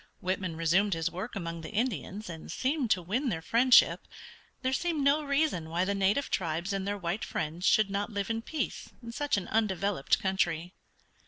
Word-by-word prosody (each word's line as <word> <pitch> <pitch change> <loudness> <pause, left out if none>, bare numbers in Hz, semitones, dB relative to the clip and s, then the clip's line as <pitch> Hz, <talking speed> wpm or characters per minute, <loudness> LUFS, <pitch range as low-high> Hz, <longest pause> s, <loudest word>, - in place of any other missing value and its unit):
Whitman 185 -2 -2
resumed 175 +4 +2
his 165 0 -1
work 190 +7 -6
among 170 -3 -4
the 160 - -7
Indians, 215 -2 -2
and 165 -2 -8
seemed 265 -2 0
to 180 -4 +2
win 245 - -1
their 170 -7 -2
friendship. 245 +5 +5 0.6
There 260 +1 +1
seemed 320 0 0
no 280 +2 +4
reason 280 - 0
why 175 +3 0
the 200 - 0
native 200 +8 +1
tribes 170 +2 -1
and 195 0 -2
their 205 0 -1
white 180 +2 -3
friends 165 +4 -2
should 215 -2 +4
not 200 +2 -1
live 200 +1 -2
in 225 0 -1
peace 310 +6 -4
in 230 - -6
such 285 0 0
an 190 - -3
undeveloped 200 -7 +1
country. 175 -2 -1
200 Hz, 185 wpm, -30 LUFS, 175-235 Hz, 0.6 s, friendship